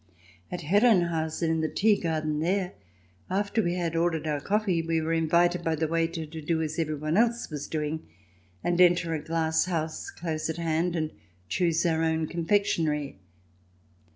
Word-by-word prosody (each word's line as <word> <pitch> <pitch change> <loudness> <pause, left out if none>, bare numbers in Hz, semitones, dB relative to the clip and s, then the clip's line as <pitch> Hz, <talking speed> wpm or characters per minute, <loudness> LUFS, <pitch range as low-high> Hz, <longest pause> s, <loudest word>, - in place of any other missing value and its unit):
At 180 - -4
Herrenhausen, 170 -4 +2
in 160 0 +1
the 155 - 0
tea 215 0 +3
garden 155 -4 -1
there, 180 +3 0 0.6
after 205 +4 0
we 175 -3 0
had 170 -2 -2
ordered 165 -2 +1
our 150 -2 -1
coffee 200 -3 +1
we 165 0 0
were 160 +1 -1
invited 170 +2 +2
by 165 -1 +1
the 160 +1 0
waiter 165 0 -1
to 160 +1 -8
do 160 +2 0
as 160 0 -2
everyone 155 +1 -1
else 235 -2 +1
was 145 -2 -5
doing, 155 0 -3 0.6
and 175 0 +2
enter 175 -2 +4
a 155 - -2
glass 160 0 +1
house 160 -3 -3
close 160 -2 -3
at 160 - -3
hand 165 +1 0
and 155 -2 -1 0.4
choose 170 - +1
our 160 -1 +2
own 160 0 +1
confectionery. 165 - 0
165 Hz, 165 wpm, -27 LUFS, 160-175 Hz, 0.6 s, enter